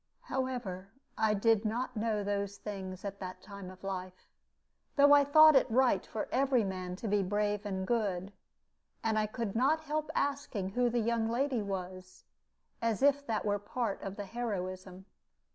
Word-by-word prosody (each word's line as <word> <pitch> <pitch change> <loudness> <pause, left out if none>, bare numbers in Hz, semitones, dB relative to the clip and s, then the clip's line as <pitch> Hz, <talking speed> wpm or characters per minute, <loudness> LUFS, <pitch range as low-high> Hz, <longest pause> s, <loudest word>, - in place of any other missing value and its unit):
However, 245 -8 -3 0.3
I 215 -1 +2
did 225 +1 +3
not 235 +4 -2
know 215 -1 0
those 200 0 -2
things 190 -2 -6
at 200 0 -5
that 185 -1 -7
time 200 -2 -9
of 185 +1 -14
life, 185 -1 -5 0.7
though 285 0 +7
I 285 0 +7
thought 310 +2 +7
it 265 - +4
right 240 -5 +3
for 220 - -4
every 265 -2 +3
man 185 -2 -4
to 220 - -6
be 205 0 +2
brave 205 +2 -1
and 190 -1 -2
good; 200 -4 -1 0.7
and 220 -1 +1
I 215 - +1
could 215 -1 -4
not 280 +7 +3
help 310 0 -2
asking 275 -9 -1
who 245 +4 +1
the 240 - -1
young 225 0 0
lady 255 0 0
was, 185 -2 -6 0.6
as 230 +2 0
if 285 0 +3
that 220 -2 -1
were 205 -1 +1
part 210 0 -3
of 195 0 -5
the 205 - -5
heroism. 190 -4 -5
210 Hz, 170 wpm, -32 LUFS, 195-245 Hz, 0.7 s, though